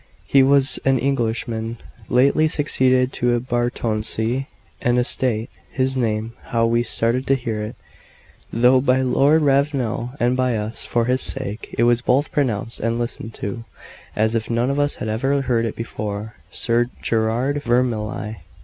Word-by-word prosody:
He 135 - +4
was 135 0 +4
an 135 0 +3
Englishman, 115 -3 -2 0.3
lately 140 +5 +4
succeeded 130 -4 +2
to 120 0 +1
a - - 0
baronetcy 120 0 -1 0.3
and 120 0 +2
estate; 120 -2 +1 0.2
his 130 0 0
name 115 -2 -1
how 115 -1 +1
we 115 +1 +2
started 120 +2 0
to 135 - +4
hear 115 -4 -3
it, 105 - -6 0.8
though 125 +3 +4
by 130 0 +2
Lord 140 +5 +3
Ravenel 135 -4 0
and 120 +1 +2
by 130 -2 +1
us, 105 +2 0
for 120 -1 0
his 130 +1 +1
sake, 125 -5 -1
it 120 - +3
was 120 0 +3
both 130 +4 +1
pronounced 115 -5 -1
and 115 +1 -1
listened 115 -1 -4
to, 100 +3 -5 0.5
as 110 +1 +1
if 115 -1 -2
none 120 +3 +1
of 140 - -1
us 145 0 +1
had - - -5
ever 135 +6 0
heard 115 -3 +1
it 115 - -4
before 105 -1 -5 0.2
Sir 120 +1 0
Gerard 120 +6 0
Vermilye. 115 -4 -1
120 Hz, 160 wpm, -21 LUFS, 115-130 Hz, 0.8 s, He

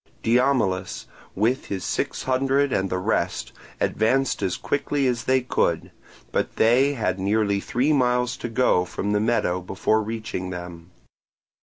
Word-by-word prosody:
Diomilus 115 -7 +1 0.3
with 115 +7 +1
his 95 -2 -4
six - - -2
hundred 135 +1 +1
and 95 0 0
the 90 - -1
rest 90 - -1 0.3
advanced 130 +4 +1
as 95 -3 -1
quickly 145 0 -1
as 120 -2 0
they 130 0 +3
could, 125 - 0 0.4
but - - -1
they 130 +5 +4
had 105 -7 -1
nearly 100 +1 +1
three 130 +9 +1
miles 125 -2 +2
to 120 - -5
go 115 -6 +3
from 100 +3 -3
the 105 - +2
meadow 105 -5 +1
before 95 +4 0
reaching 110 -4 -4
them. 90 -1 -8
115 Hz, 145 wpm, -24 LUFS, 95-130 Hz, 0.4 s, they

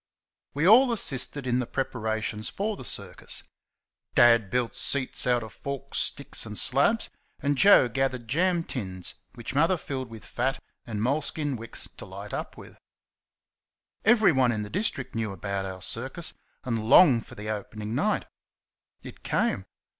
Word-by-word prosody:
We 155 +4 +2
all 245 +5 +7
assisted 140 - 0
in 125 0 +1
the 125 - -2
preparations 110 -4 -2
for 210 +2 -2
the 130 - -9
circus. 100 -6 -4 0.7
Dad 115 -4 +6
built 125 +2 -1
seats 130 -2 0
out 120 -1 +3
of 110 -3 -10
forked 140 0 -6
sticks 140 - -2
and 105 -2 -6
slabs, 140 - +2 0.3
and 145 0 +1
Joe 195 -3 +7
gathered 130 -1 -1
jam 170 +6 +2
tins 95 - -5 0.2
which 120 0 -6
Mother 165 +6 +3
filled 130 -5 -5
with 115 -1 -11
fat 130 +3 -1 0.3
and 110 -2 -3
moleskin 145 +2 0
wicks 115 0 -6
to - - -7
light - - -8
up - - -5
with. - - -13 1.2
Everyone 185 - +5
in 105 -2 -2
the 105 - -8
district 185 - -1
knew 110 -2 -2
about 95 +1 -3
our 95 -1 -7
circus, 130 - -4 0.3
and 115 -4 -2
longed 130 -10 +7
for - - -12
the 105 +1 -4
opening 105 +1 -5
night. 205 - +1 0.8
It - - -11
came. - - 0
125 Hz, 155 wpm, -27 LUFS, 110-145 Hz, 1.2 s, all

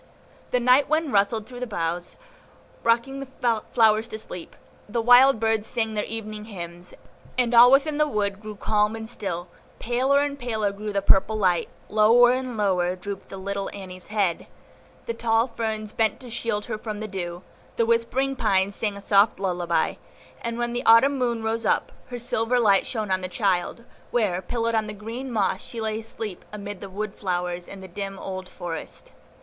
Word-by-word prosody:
The 250 - +2
night 255 +3 +4
wind 310 -3 +1
rustled 210 +2 +2
through 245 +1 -10
the 250 - -3
boughs, 175 -3 -3 0.7
rocking 235 +4 +1
the 250 -4 -1
flowers 220 -1 +4
to 215 - -6
sleep; 180 -5 -8 0.3
the 235 - -1
wild 245 +2 +7
birds 220 -1 +1
sang 225 -2 -1
their 210 -1 -1
evening 215 -1 -6
hymns, 175 -4 -8 0.4
and 245 -1 +2
all 240 +1 +9
within 290 +2 +3
the 300 - +4
wood 205 -6 -1
grew 215 -1 -7
calm 210 +1 +1
and 220 0 -6
still; 180 -6 -4 0.3
paler 260 +4 +2
and 285 -1 -2
paler 220 -5 -1
grew 210 +1 -5
the 200 -1 -1
purple 200 +3 +4
light, 180 -4 +2 0.2
lower 230 +3 +6
and 255 -2 -2
lower 185 -3 +1
drooped 195 +1 -7
little 195 0 -4
Annie's 185 -2 -7
head, 200 -6 0 0.6
the 230 - -2
tall 230 0 +2
ferns 220 -3 -4
bent 220 -2 +1
to 250 -2 -10
shield 220 -3 -2
her 215 - -4
from 215 -2 -5
the 215 - -4
dew, 175 -2 -5 0.3
the 230 - +2
whispering 235 +4 +1
pines 200 -4 +1
sang 210 -2 -2
a - - -9
soft 200 +1 +4
lullaby; 175 -3 0 0.4
and 235 0 -3
when 240 0 -1
the 240 - -2
Autumn 265 +5 +6
moon 235 -3 0
rose 225 +1 -1
up, - - +1 0.2
her 245 - -6
silver 240 0 0
light 200 -4 +4
shone 215 -5 -3
on 185 0 +1
the 185 - -3
child, 190 +2 -1 0.3
where, 200 -7 +1
pillowed 230 +4 -1
on 220 -1 +1
green 230 +6 -6
moss, 195 -4 0
she 235 - -7
lay 220 0 -2
asleep 220 -3 -7
amid 205 -2 -7
the 200 - -7
wood 205 +1 -4
flowers 180 -2 -3
in 195 - -10
the 190 - -9
dim 195 +2 -5
old 185 -1 -6
forest. 165 -2 -7
215 Hz, 185 wpm, -25 LUFS, 195-235 Hz, 0.7 s, all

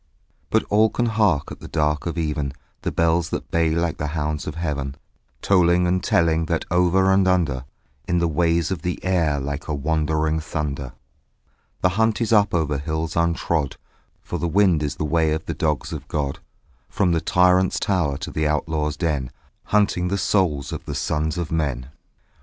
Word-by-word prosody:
But 110 - +2
all 110 +2 +5
can 120 - -1
hark 105 -11 +1
at - - -8
the - - -9
dark 75 0 0
of 85 - -3
even 75 -4 -2 0.3
The - - -2
bells 85 0 +1
that - - -5
bay 85 -1 +2
like 85 0 0
the 75 - -1
hounds 75 0 -2
of 75 - -4
heaven, 70 -5 -3 0.5
Tolling 90 -2 +4
and 90 0 +1
telling 80 -1 +2
that 85 0 -1
over 90 +2 +3
and 95 0 +4
under, 80 -9 +1 0.4
In 90 - +1
the 85 0 +2
ways 85 +2 +1
of 90 -5 -2
the 90 +1 -2
air 85 -6 +1
like 70 +2 -4
a 75 - -1
wandering 80 +1 0
thunder, 70 -5 -4 0.9
The 90 - +4
hunt 110 -1 +2
is 115 -1 +1
up 105 -2 +4
over 75 -4 0
hills 80 +2 -3
untrod: 85 -3 0 0.5
For - - -4
the 85 - -1
wind 90 -2 +3
is 70 -2 -2
the 75 - -3
way 80 0 +2
of 80 +1 -3
the - - -3
dogs 75 -5 -1
of - - -7
God: 70 -2 -2 0.5
From 95 -3 +1
the 85 -1 +1
tyrant's 90 +1 +3
tower 85 -8 0
to - - -5
the 80 -1 0
outlaw's 75 0 -1
den 75 -7 -1 0.4
Hunting 100 -4 +2
the 100 +2 0
souls 85 -9 +1
of - - -5
the - - -5
sons 80 +2 -1
of 85 -3 -3
men. 70 -5 -2
80 Hz, 185 wpm, -22 LUFS, 75-90 Hz, 0.9 s, all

